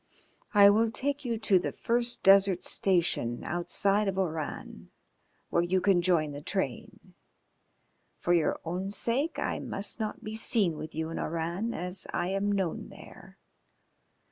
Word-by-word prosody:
"I 200 0 +8
will 225 +2 +3
take 280 +5 -3
you 235 -3 -2
to 210 -4 +3
the - - -3
first 240 +1 -1
desert 195 -2 +5
station 170 -10 0
outside 195 +4 0
of 190 -1 -2
Oran, 160 -5 -4 0.6
where 170 - +3
you 180 +2 +1
can 185 -1 +3
join 170 -4 +1
the 145 0 -7
train. 150 - -5 1.0
For 175 - 0
your 170 -3 +1
own 180 +4 -3
sake 235 - -1
I - - -2
must 200 +4 -5
not 220 +1 -4
be 215 0 -6
seen 220 -6 +1
with 155 +1 -8
you 160 +1 -3
in - - -4
Oran, 170 +8 -3
as 180 +2 -1
I 175 +1 -1
am 195 +1 0
known 190 -4 -2
there. - - -14
190 Hz, 150 wpm, -29 LUFS, 170-210 Hz, 1.0 s, I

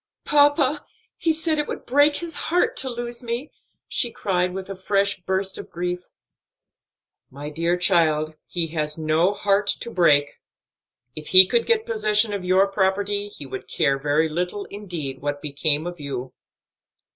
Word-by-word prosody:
"Papa, 290 0 +3 0.3
he 330 - 0
said 315 -1 0
it 295 - -1
would - - -6
break 290 +3 +3
his 340 -1 -5 0.2
heart 360 +8 +1
to 260 - +2
lose 240 0 -5
me," 240 +4 -5 0.4
she 240 - -1
cried 180 -4 -1
with 190 0 -6
a 195 - -6
fresh 200 +1 0
burst 190 +1 -1
of - - -9
grief. 180 +1 -4 1.2
"My 145 +3 -8
dear 170 +3 0
child, 160 -4 +2
he 170 -2 -1
has 150 -1 -2
no 160 +4 +2
heart 205 0 +1
to 235 - -7
break. 145 -7 +2 0.8
If 155 0 -8
he 185 0 +10
could 235 +4 0
get 455 -1 +2
possession 215 -1 +1
of 200 -2 -4
your 185 +2 +3
property, 200 +1 -1
he 150 -8 -10
would 135 - -8
care 135 0 0
very 150 +3 +1
little 180 +5 -3
indeed 170 -10 -6
what 145 0 -3
became 150 +1 +1
of 175 -1 -6
you." 130 -3 -6
190 Hz, 160 wpm, -23 LUFS, 155-225 Hz, 1.2 s, he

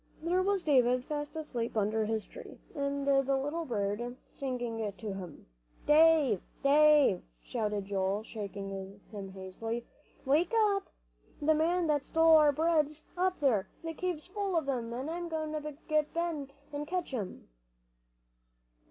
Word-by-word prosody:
There 355 +3 +2
was 390 -1 +1
David 255 -3 +3
fast 295 +1 -4
asleep 240 -8 -3
under 215 +1 +1
his 220 0 -1
tree, - - -11 0.2
and 280 -2 -2
the 275 -1 +3
little 295 +5 -2
bird 230 0 -2 0.2
singing 240 -5 -3
to 210 0 -6
him. 180 -5 -8 0.4
"Dave 300 - +5 0.2
Dave!" 290 -7 +6 0.2
shouted 210 -4 -2
Joel, 195 +1 -1
shaking 195 -2 -6
him 200 -3 -6
hastily, 225 +5 -5 0.4
"wake 320 +10 +2
up! 410 -3 +3 0.5
The 310 +1 +3
man 335 +3 +2
that 295 -3 +1
stole 325 0 +5
our 300 -1 +6
bread's 310 0 +1
up 370 +1 0
there. 220 -8 +2 0.2
The 325 0 -4
cave's 350 -2 -3
full 390 -1 -2
of 315 - -1
'em. 240 -4 -2
I'm 320 +8 -4
goin' 315 -1 -2
to 300 -2 -5
get 305 0 +1
Ben, 330 -5 -2 0.2
an' 290 +1 -4
catch 355 -3 -3
'em!" 205 -7 -5
280 Hz, 145 wpm, -31 LUFS, 225-320 Hz, 0.5 s, Dave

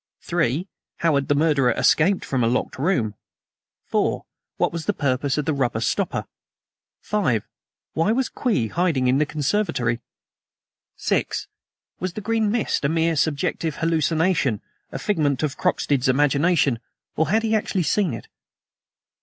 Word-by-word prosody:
(3) 170 0 0 0.3
How 165 -2 +2
had 140 -1 +1
the 145 - +2
murderer 145 -4 +3
escaped 165 +8 +3
from 130 -3 0
a - - +3
locked 125 +2 -1
room? 135 - +1 0.7
(4) - - 0 0.3
What - - +1
was 165 -2 -5
the - - +2
purpose 140 0 0
of 150 - -1
the 160 - +1
rubber 125 -5 0
stopper? 115 - -1 0.8
(5) 155 - +1 0.5
Why 165 +7 +2
was 255 +2 +1
Kwee 165 - -1
hiding 165 - +1
in 130 +2 +3
the 150 - +2
conservatory? 145 - 0 1.0
(6) - - -1 0.5
Was 185 -1 -3
the - - -5
green 220 0 +1
mist 225 -6 0
a 140 - +2
mere 165 +1 +1
subjective 160 +1 0
hallucination 160 - +1 0.3
a - - -4
figment 150 -8 0
of 145 -3 -1
Croxted's 135 -3 +1
imagination 145 0 +3 0.4
or 160 -1 +1
had 220 +4 +2
he 225 0 0
actually 200 -3 0
seen 190 +1 +1
it? - - -10
155 Hz, 145 wpm, -23 LUFS, 135-180 Hz, 1.0 s, murderer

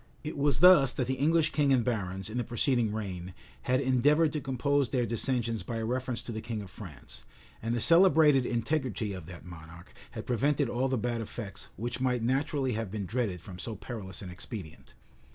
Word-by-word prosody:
It 155 - -5
was 140 0 +1
thus 180 -8 +8
that 125 - -1
the 130 - -1
English 155 +4 +2
king 145 -2 +2
and 125 -3 +3
barons, 95 -6 -2
in 115 +3 -3
the - - 0
preceding 120 -1 +1
reign, 95 -4 -5 0.3
had 130 0 +1
endeavored 145 +4 +3
to 150 - -2
compose 135 +1 +1
their 125 -3 +1
dissensions 115 -1 -1
by 115 - -4
a 110 - -2
reference 125 -1 -2
to - - -6
the 110 -1 -4
king 110 -3 -4
of 95 - -12
France; 85 - -11 0.4
and 115 +1 -1
the - - 0
celebrated 160 - +6
integrity 120 -3 -1
of 90 -4 -8
that 90 -2 -10
monarch 85 0 -12 0.2
had 110 -2 -7
prevented 135 +2 +1
all 125 +3 0
the 130 -1 0
bad 120 +1 -1
effects 105 -2 -7
which 120 +2 -4
might 125 -3 +1
naturally 135 +2 0
have 110 -2 -2
been 100 0 -4
dreaded 105 -5 -2
from 90 -1 -10
so 110 +3 -4
perilous 100 -3 -7
an 90 - -7
expedient. 90 -2 -8
120 Hz, 200 wpm, -30 LUFS, 105-135 Hz, 0.4 s, thus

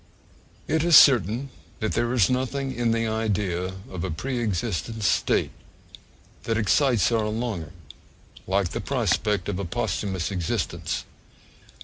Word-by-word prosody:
It 160 +1 +1
is 170 -1 +5
certain 125 - +5 0.3
that 110 - -1
there 120 0 0
is 120 -7 +4
nothing 130 +1 -1
in 120 -2 0
the 115 0 +1
idea 105 -5 -1 0.2
of 90 -2 -6
a 95 - -2
pre 120 +10 -3
existent 110 +1 -2
state 95 - +1 0.9
that 115 -1 0
excites 110 - +3
our 110 -2 +1
longing 110 -6 -3 0.8
like 95 -1 +1
the - - -4
prospect 105 -6 0
of 100 -2 -2
a - - -2
posthumous 95 +2 -2
existence. 90 -4 -2
110 Hz, 130 wpm, -25 LUFS, 95-120 Hz, 0.9 s, is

